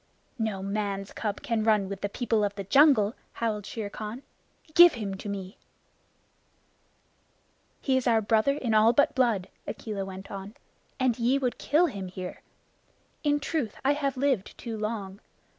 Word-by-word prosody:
"No 215 Hz, -4 st, -2 dB
man's 200 Hz, -1 st, -3 dB
cub 210 Hz, +1 st, -3 dB
can 230 Hz, -6 st, 0 dB
run 215 Hz, -3 st, +3 dB
with 195 Hz, 0 st, -6 dB
the 205 Hz, -, -1 dB
people 225 Hz, -1 st, 0 dB
of 205 Hz, 0 st, -1 dB
the 200 Hz, -, -4 dB
jungle," 225 Hz, -1 st, +5 dB, 0.2 s
howled 215 Hz, -3 st, -2 dB
Shere 210 Hz, -3 st, -5 dB
Khan. 215 Hz, +6 st, -6 dB, 0.5 s
"Give 345 Hz, 0 st, +9 dB
him 210 Hz, -4 st, -4 dB
to 205 Hz, -, -7 dB
me!" 195 Hz, +3 st, -6 dB, 2.2 s
"He 265 Hz, -2 st, +2 dB
is 260 Hz, -, -1 dB
our 230 Hz, -2 st, +5 dB
brother 220 Hz, +5 st, +2 dB
in 235 Hz, -6 st, -1 dB
all 220 Hz, +2 st, +6 dB
but 285 Hz, -, +3 dB
blood," 230 Hz, -8 st, +1 dB, 0.2 s
Akela 210 Hz, -3 st, -4 dB
went 190 Hz, 0 st, -8 dB
on, 200 Hz, +2 st, -7 dB, 0.4 s
"and 255 Hz, -2 st, +1 dB
ye 245 Hz, +4 st, +3 dB
would 255 Hz, -3 st, -2 dB
kill 310 Hz, +5 st, +3 dB
him 200 Hz, -, -4 dB
here! 185 Hz, 0 st, -7 dB, 0.8 s
In 290 Hz, -1 st, +2 dB
truth, 285 Hz, -6 st, -2 dB
I 280 Hz, -, +5 dB
have 280 Hz, -3 st, -2 dB
lived 260 Hz, -7 st, 0 dB
too 230 Hz, -2 st, -5 dB
long. 210 Hz, -3 st, -4 dB
220 Hz, 160 wpm, -28 LUFS, 200-260 Hz, 2.2 s, Give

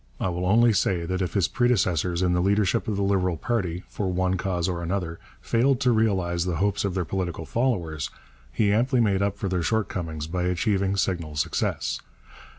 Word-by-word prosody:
I -, -, 0 dB
will 90 Hz, +1 st, -2 dB
only 115 Hz, +3 st, +5 dB
say 90 Hz, -4 st, +1 dB
that 90 Hz, +2 st, -2 dB
if 90 Hz, -, -2 dB
his 95 Hz, -5 st, +3 dB
predecessors 95 Hz, -, +1 dB
in 90 Hz, -1 st, +2 dB
the 90 Hz, -, +2 dB
leadership 100 Hz, +3 st, +1 dB
of 105 Hz, -, -1 dB
the 100 Hz, -, 0 dB
Liberal 95 Hz, -3 st, +1 dB
party, 95 Hz, -4 st, -2 dB
for 95 Hz, -3 st, -3 dB
one 95 Hz, +1 st, +1 dB
cause 90 Hz, -2 st, -1 dB
or 85 Hz, -2 st, -2 dB
another, 85 Hz, -1 st, -3 dB, 0.2 s
failed 125 Hz, +2 st, +2 dB
to 125 Hz, -, +4 dB
realize 95 Hz, -6 st, +1 dB
the 90 Hz, -2 st, -2 dB
hopes 100 Hz, +4 st, 0 dB
of 100 Hz, -2 st, -1 dB
their 90 Hz, -2 st, 0 dB
political 85 Hz, -3 st, -3 dB
followers, 90 Hz, -, -1 dB, 0.4 s
he 105 Hz, -2 st, +2 dB
amply 125 Hz, +4 st, +2 dB
made 100 Hz, -4 st, +2 dB
up 100 Hz, 0 st, 0 dB
for 100 Hz, -, -3 dB
their 90 Hz, -2 st, 0 dB
shortcomings 85 Hz, -6 st, -2 dB
by 90 Hz, +2 st, -2 dB
achieving 95 Hz, +2 st, +1 dB
signal 85 Hz, -6 st, -1 dB
success. 75 Hz, -, -1 dB
95 Hz, 190 wpm, -25 LUFS, 85-105 Hz, 0.4 s, only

